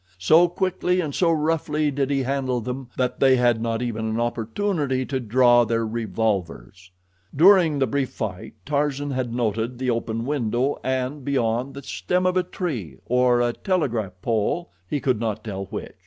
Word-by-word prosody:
So 160 - +5
quickly 180 0 0
and 155 -5 -2
so 170 +2 +2
roughly 155 -1 0
did 140 -1 -1
he 135 -2 +1
handle 130 -1 -1
them 125 +2 -5
that 125 -1 -1
they 135 -1 +5
had 120 -2 +2
not 115 +1 -1
even 115 -2 -3
an 110 +1 -1
opportunity 130 - -1
to 130 0 -2
draw 120 +1 +4
their 115 0 0
revolvers. 100 - -3 0.5
During 170 -1 +6
the 135 - +2
brief 135 +2 -1
fight 100 -4 -6
Tarzan 145 -1 -1
had 130 -3 -2
noted 115 0 -1
the 130 0 0
open 115 0 -2
window 130 -1 0
and, 130 +2 -2
beyond, 125 -1 -1
the 140 - -8
stem 180 +6 -1
of 185 0 +2
a 185 - +4
tree, 140 - -5
or 125 0 +3
a 120 -1 +1
telegraph 120 - -1
pole—he 115 - -2
could 130 -5 0
not 110 -2 -2
tell 100 -3 -5
which. - - -7
125 Hz, 170 wpm, -23 LUFS, 115-145 Hz, 0.5 s, During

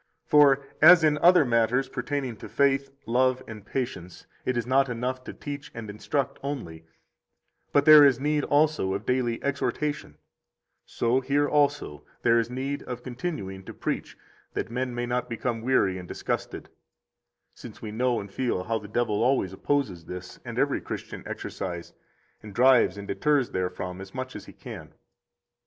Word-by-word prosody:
44 145 -2 +6
For - - -26
as 165 +2 +9
in 150 -1 +3
other 175 -1 +6
matters 120 +2 +2
pertaining 140 -5 -3
to - - -10
faith, 140 -1 +2 0.2
love, 130 +2 +2
and 110 -2 -9
patience, 95 -7 -5 0.2
it 130 -1 0
is 120 - -1
not 135 +1 +3
enough 125 +2 -3
to - - -6
teach 145 -1 -7
and 110 -3 -6
instruct 120 +7 -2
only, 85 - -6 0.8
but 145 0 +3
there 155 -1 +10
is 135 -3 +5
need 150 +1 0
also 145 -10 +2
of 100 - -5
daily 125 -2 0
exhortation, 145 +1 -2 0.7
so 120 +2 +1
here 140 +2 +1
also 145 - 0 0.2
there 115 0 +5
is 115 0 -1
need 135 +3 -3
of 125 0 -7
continuing 120 - -5
to - - -10
preach - - -4 0.4
that - - -3
men 125 0 -2
may 120 0 -2
not 125 +1 -2
become 115 0 -2
weary 105 -7 +2
and 90 - -9
disgusted, - - -4 0.8
since - - -11
we 110 - -5
know 120 +2 +1
and 100 0 -8
feel 120 -8 -1
how 115 +3 -1
the 105 - -10
devil 105 -1 0
always 120 -7 +2
opposes 110 - -1
this 90 0 -8
and - - -7
every - - +1
Christian - - -6
exercise, 85 -3 -6 0.5
and 105 -2 -11
drives 125 -6 +5
and 100 0 -7
deters 145 -4 +1
therefrom 90 0 -3
as 95 +3 -11
much 130 0 -5
as - - -8
he - - -13
can. - - -10
125 Hz, 170 wpm, -26 LUFS, 105-140 Hz, 0.8 s, there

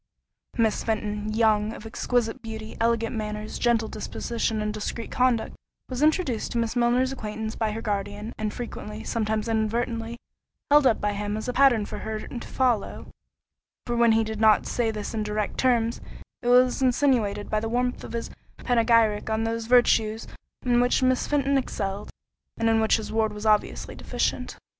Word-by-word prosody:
Miss 225 -2 +1
Fenton, 210 -1 -2
young, 215 -1 +2
of 220 - -10
exquisite 235 +2 -1
beauty, 220 -1 -7
elegant 230 0 +1
manners, 210 0 -4
gentle 235 -2 +2
disposition, 225 +1 -3
and 210 0 -2
discreet 215 +2 -5
conduct, 250 -3 +1 0.3
was 255 0 -4
introduced 305 - +1
to - - -1
Miss 230 0 -1
Milner's 245 +2 +2
acquaintance 220 -3 -5
by 220 -1 -1
her 225 +2 -5
guardian, 205 +1 -3
and 215 -1 -3
frequently, 215 -2 -7
sometimes 220 -1 -1
inadvertently, 230 +1 -1 0.5
held 295 -2 +7
up 230 - +2
by 210 0 0
him 205 +1 -3
as 215 - -5
a 250 - -1
pattern 245 -5 +4
for - - -7
her 220 0 -4
to 235 - -7
follow—for 240 0 -4
when 235 -1 +5
he 225 0 +3
did 220 0 -5
not 215 -1 +5
say 235 -2 0
this 215 -1 -4
in 220 - -1
direct 210 0 -2
terms, 235 -2 +2 0.4
it 240 - -5
was 250 +2 +4
insinuated 245 -6 +2
by 215 - 0
the 225 +1 -3
warmth 245 +1 -1
of - - -8
his 230 0 -4 0.3
panegyric 230 -3 +2
on 220 0 0
those 225 0 -2
virtues 225 -3 +3 0.4
in 245 -1 +4
which 245 +1 +2
Miss 255 0 +2
Fenton 280 -1 +2
excelled, 200 -5 -4 0.5
and 230 - +1
in 225 0 +3
which 220 - +3
his 220 -2 -6
ward 220 -1 +1
was 210 +1 -7
obviously 215 -1 +1
deficient. - - -2
225 Hz, 170 wpm, -25 LUFS, 215-240 Hz, 0.5 s, held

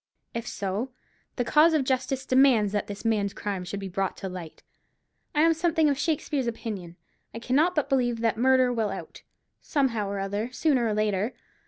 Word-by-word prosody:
If 235 0 -4
so, 200 +6 -3 0.5
the 245 - -1
cause 315 +5 +5
of 295 - +2
justice 260 0 -1
demands 255 -6 +4
that 205 0 -1
this 205 +2 -8
man's 205 -3 +1
crime 200 -3 -3
should 200 +3 -5
be 195 - -5
brought 190 +1 -2
to 190 - -5
light. 180 -3 -9 0.7
I 300 - +4
am 330 +1 +5
something 320 -2 +2
of 280 - -2
Shakspeare's 295 -5 -1
opinion; 205 -7 -5 0.4
I - - -4
cannot 285 +10 +2
but 300 - +1
believe 245 -3 +1
that 230 -1 +2
'murder 255 +1 +3
will 225 -3 0
out,' - - -7 0.4
somehow 235 -9 0
or 200 - -3
other, 205 +4 -3
sooner 255 -3 +2
or 215 - 0
later. 215 +2 0
235 Hz, 185 wpm, -27 LUFS, 205-270 Hz, 0.7 s, cause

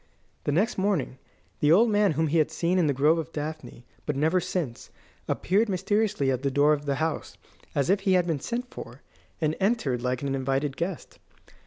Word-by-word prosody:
The - - +1
next 195 +8 +1
morning 185 -10 0 0.4
the 150 - +3
old 215 +8 +6
man 205 -4 +3
whom 160 +2 +1
he 160 +2 +2
had 155 - +2
seen 175 +2 0
in 165 - +3
the - - +3
Grove 150 +5 +3
of 165 0 -5
Daphne, 150 -6 -6 0.2
but 150 - 0
never 160 +6 +2
since, 160 -10 -4 0.4
appeared 210 +5 +1
mysteriously 195 -5 +1
at 130 -1 -1
the 140 - 0
door 145 +3 +4
of 145 -1 -3
the 140 - +1
house, 160 +1 -3 0.4
as 140 -2 +1
if 195 +1 +3
he 195 -1 +1
had 180 -1 +3
been 160 -4 -1
sent 245 - -4
for, 120 +4 -10 0.4
and 155 -1 0
entered 190 - +1
like 125 +1 -2
an 140 -1 -1
invited 135 +1 -1
guest. 170 0 -5
155 Hz, 200 wpm, -26 LUFS, 140-190 Hz, 0.4 s, old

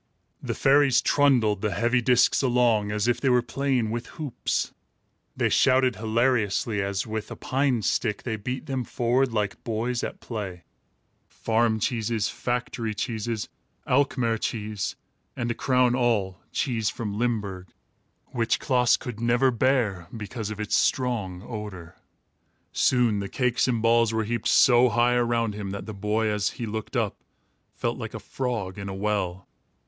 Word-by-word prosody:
The - - -3
fairies 135 -2 +4
trundled 120 -8 +3
the 105 -4 -1
heavy 120 +5 +2
discs 125 0 +4
along, 120 -5 +2
as 105 +1 0
if 120 0 +1
they 135 - +2
were 125 -1 +4
playing 125 -2 0
with 120 +1 -4
hoops. 150 -6 -2 0.6
They - - +2
shouted 130 -1 +3
hilariously, 110 -2 +1
as, 100 0 -2
with 110 -1 -4
a - - -6
pine 130 -4 0
stick, 105 0 0
they 115 -3 -2
beat 125 +7 -5
them 135 -3 -2
forward 125 +2 +1
like 105 -3 -2
boys 115 +2 -2
at - - -5
play. 95 -7 -6 0.6
Farm 110 -1 0
cheese, 115 -2 0
factory 120 -2 -3
cheese, 110 0 -3 0.4
Alkmaar 125 -4 +1
cheese, 105 -3 -3 0.4
and, 120 - -2
to - - +1
crown 125 0 +2
all, 110 -7 0
cheese 115 -7 0
from 105 -2 -4
Limburg 100 -6 -2 0.6
which 115 -2 0
Klaas 125 -4 +3 0.2
never 120 +3 +3
could 115 - -9
bear, 115 -10 +1
because 110 0 -5
of 105 -1 -6
its 105 -1 0
strong 110 -9 0
odor. 100 -7 -7 0.8
Soon 120 -5 +2
the 100 -1 -4
cakes 125 -1 +1
and 115 -3 0
balls 115 -1 +4
were 110 0 0
heaped 115 0 -2
so 125 0 +6
high 120 +1 +3
around 120 -2 +1
him 100 -1 -5
that 100 0 -5
the 110 - -6
boy, 105 +2 0
as 105 -2 0
he 120 - -3
looked 110 0 -5
up, - - -2 0.5
felt - - -2
like - - -6
a - - -4
frog 110 -7 -4
in 100 0 -5
a 95 - -5
well. 95 -3 -2
115 Hz, 155 wpm, -26 LUFS, 105-125 Hz, 0.8 s, so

